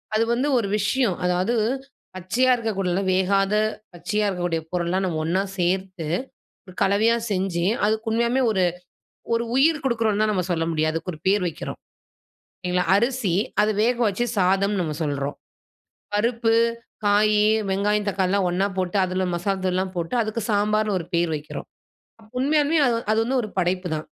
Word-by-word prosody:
அது 220 - +3
வந்து 255 +4 0
ஒரு 225 -4 0
விஷயம் 215 -1 +1
அதாவது 180 +5 +1 0.6
பச்சையா 210 +8 +1
இருக்கக்கூடிய 195 -6 -1
வேகாத 195 +2 +2 0.4
பச்சையா 195 +5 -1
இருக்கக்கூடிய 175 -3 -2
பொருள்லாம் 180 +2 0
நம்ம 165 -4 -2
ஒண்ணா 180 +4 +1 0.2
சேர்த்து 185 -2 -1 0.7
கலவையா 210 +4 +3 0.2
செஞ்சு 185 -3 -1 0.2
அதுக்கு 220 +2 -1
உண்மையாவே 235 +3 +1
ஒரு 190 -4 +1 0.7
ஒரு 230 0 +1
உயிர் 300 +3 +3
குடுக்கிறோம்ன்லா 225 -4 +1
நம்ம 185 -3 0
சொல்ல 165 -1 0
முடியாது. 155 0 0
அதுக்கு 165 +3 -3
ஒரு 155 - -11
பேர் 200 0 +3
வைக்கிறோம். 165 - -6 0.9
இல்லைங்களா, 180 0 0
அரிசி 235 -3 0 0.3
அத 210 - +2
வேக 240 +2 +2
வச்சு 205 +4 -1
சாதம்னு 195 +2 +2
நம்ம 155 -3 -3
சொல்றோம். 145 -1 -2 0.8
பருப்பு, 230 +2 +1 0.5
காய், 210 +1 +4 0.3
வெங்காயம், 205 +2 0
தக்காளிலாம் 190 0 +1
ஒன்னா 180 +3 +1
போட்டு 185 +1 -1
அதில 185 +1 -2
மசாலா 190 +3 -1
தூள்லாம் 185 0 -1
போட்டு 170 +7 -2
அதுக்கு 220 +1 -3
சாம்பார்ன்னு 210 0 +1
ஒரு 165 - -6
பேர் 170 -1 +1
வைக்கிறோம். 150 +1 -7 0.5
அப்ப 215 0 -20
உண்மையாலுமே 300 +3 +2
அது 235 -1 +1
அது 220 - +2
வந்து 260 +2 +1
ஒரு 215 - -5
படைப்புதான். 180 -3 -1
195 Hz, 145 wpm, -23 LUFS, 180-220 Hz, 0.9 s, காய்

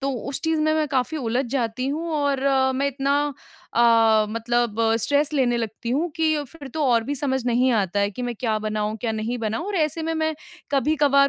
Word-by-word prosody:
तो 275 0 -1 0.2
उस 275 - -4
चीज़ 320 -1 +1
में 310 0 +2
मैं 310 -1 +1
काफ़ी 270 +3 0
उलझ 250 -1 -1
जाती 250 -1 -1
हूँ 320 +4 -3
और 285 -2 0 0.3
मैं 275 +2 0
इतना 275 +1 -1 0.6
अ, 225 -2 +5
मतलब 230 0 -1 0.2
स्ट्रेस 285 +6 +1
लेने 255 -5 +2
लगती 230 +1 -4
हूँ 310 +7 0
कि 320 -1 +2
फ़िर 285 0 -11
तो 310 - 0
और 235 -2 +3
भी 285 - -2
समझ 265 -2 -1
नहीं 250 +2 +3
आता 200 -3 +1
है 200 0 +1
कि 230 +5 -7
मैं 245 -1 -2
क्या 220 -2 0
बनाऊँ, 215 0 -2
क्या 225 0 -2
नहीं 220 +3 -3
बनाऊँ 225 - -2
और 410 - -3
ऐसे 315 0 0
में 325 +1 -1
मैं 315 0 0 0.4
कभी-कभार 280 -1 +3
260 Hz, 205 wpm, -23 LUFS, 230-290 Hz, 0.6 s, अ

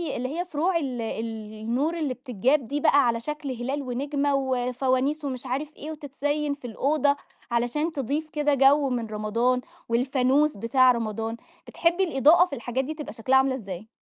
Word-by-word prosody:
اللي 255 +1 -3
هي 355 - -1
فروع 340 +2 0
ال 260 -7 -3
ال 220 -1 -5
النور 265 +10 0
اللي 295 -5 -1
بتتجاب 255 +1 0
دي 285 +4 -2
بقى 280 -3 +5
على 230 -1 +1
شكل 300 +3 -5
هلال 260 +4 -3
ونجمة 280 +2 -1
وفوانيس 260 +2 0
ومش 260 -2 -4
عارف 280 +4 -3
إيه 310 - -7
وتتزيّن 290 0 -2
في 280 -3 -11
الأوضة 285 +5 +1 0.4
علشان 245 +8 0
تضيف 290 +3 -2
كده 295 -1 +1
جَو 275 +1 +5
من 240 -3 -2
رمضان 225 +4 0 0.3
والفانوس 260 +4 +2
بتاع 250 +4 +4
رمضان، 225 -1 -3 0.3
بتحبّي 345 +3 +1
الإضاءة 320 +1 +5
في 355 - -10
الحاجات 245 +1 -2
دي 300 +4 -4
تبقى 305 -1 -7
شكلها 255 +3 +2
عاملة 265 0 +3
إزاي؟ 200 -4 -7
265 Hz, 165 wpm, -26 LUFS, 240-295 Hz, 0.4 s, بقى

